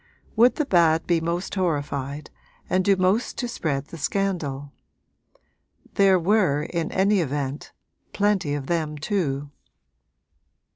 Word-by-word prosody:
Would 235 +3 +5
the 300 - 0
bad 165 - +3
be 170 -2 +1
most 170 +3 -3
horrified 145 -5 -2 0.4
and 185 0 +1
do 195 +1 +4
most 190 +5 0
to 245 - -2
spread 145 - -2
the 165 - -11
scandal? 145 -6 -2 1.2
There 195 -1 +5
were, 180 -5 +2
in 165 0 -3
any 195 +1 +2
event, 145 -2 -3 0.4
plenty 195 -8 +1
of 140 -2 -4
them 155 -1 -2
too. 145 -5 -2
170 Hz, 125 wpm, -24 LUFS, 145-195 Hz, 1.2 s, Would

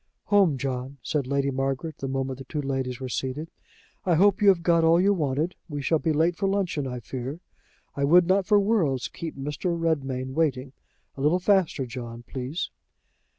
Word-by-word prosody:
"Home, 190 -9 +5
John," 130 +1 -4
said 145 -4 -1
Lady 140 0 0
Margaret, 135 +4 -2
the 135 - -3
moment 135 0 -3
the 135 - -8
two 150 - -4
ladies 130 -2 -2
were 130 - -4
seated. 135 +6 -4 0.5
"I 175 -3 +2
hope 195 +4 +4
you 205 - +4
have 185 -4 +5
got 170 -1 +3
all 165 +1 +5
you 200 +3 +4
wanted. 155 0 -1 0.2
We 145 -2 -4
shall 160 +2 +2
be 160 - 0
late 165 +3 +2
for 195 +2 -1
luncheon, 180 -8 -1
I 125 -1 -4
fear. 130 +6 -5 0.6
I 140 - -1
would 170 +5 +6
not 190 +1 +2
for 210 -1 +5
worlds 180 - +1
keep 165 -4 -7
Mr. 150 +5 -2
Redmain 135 -5 -1
waiting. 135 -4 0 0.4
A - - -5
little 150 +5 +3
faster, 185 -7 +2
John, 120 -1 -7
please." 130 +6 -4
145 Hz, 190 wpm, -26 LUFS, 130-170 Hz, 0.6 s, would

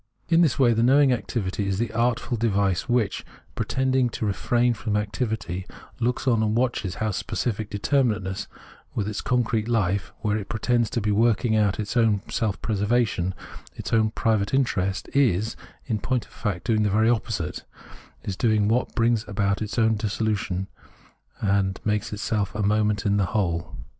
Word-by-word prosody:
In 165 0 +5
this 160 -7 +3
way 120 -4 +4
the 115 - +1
knowing 135 +2 +5
activity 100 -4 -2
is 95 -1 0
the 115 +1 -1
artful 120 +1 0
device 100 -2 0
which, 120 -4 +1 0.3
pretending 130 -1 +1
to 110 - -4
refrain 120 +4 +1
from 105 0 -2
activity, 105 -4 -3 0.3
looks 125 +2 -1
on 115 -3 +3
and 110 0 +1
watches 120 -7 0
how 110 -1 -1
specific 110 +2 -2
determinateness, 105 -4 0 0.5
with 105 - -1
its 105 -1 -3
concrete 115 -3 0
fife, 100 -4 +1
just - - -19
where 105 -1 +1
it 100 -2 -6
pretends 120 +1 +1
to 120 - -2
be 105 0 0
working 110 +1 +2
out 105 -2 +2
its 105 +2 -3
own 110 -4 +3
self 105 -3 -1
preservation 105 -2 +1
and - - -15
its - - -4
own 110 -1 +4
private 110 0 0
interest, 100 -8 0
is, 110 -6 +2 0.3
in 110 -4 -1
point 125 +2 -1
of - - -23
fact, 100 -6 -3
doing 110 -2 +2
the 105 - +2
very 110 +3 +3
opposite, 110 -8 -1 0.6
is 100 - -3
doing 105 -1 +2
what 120 +4 0
brings 115 -2 +2
about 100 -1 0
its 105 +1 -4
own 110 -1 +3
dissolution 105 -3 -1 0.7
and 100 -1 +1
makes 105 0 0
itself 105 -1 -2
a 105 - -1
moment 105 0 +1
in 100 0 +2
the 100 - +2
whole. 85 -7 -1
110 Hz, 175 wpm, -25 LUFS, 100-120 Hz, 0.7 s, In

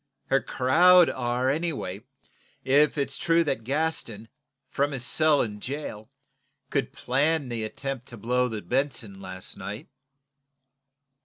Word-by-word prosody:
Her 135 0 +4
crowd 175 +7 +5
are 125 0 -1
anyway, 140 - -2 0.6
if 145 +3 +3
it's 140 -1 -2
true 170 0 +3
that 135 -7 -2
Gaston, 125 -6 -2 0.4
from 140 +2 -1
his 125 -2 -2
cell 155 0 +3
in 105 -2 -6
jail, 125 -4 -6 0.6
could 140 - 0
plan 140 +2 0
the 115 -2 -3
attempt 135 +4 -5
to 120 - -10
blow 125 +3 +1
the 110 -4 -5
'Benson' 115 -3 -2
last 95 -1 -6
night." 100 +2 -7
130 Hz, 130 wpm, -26 LUFS, 110-145 Hz, 0.6 s, crowd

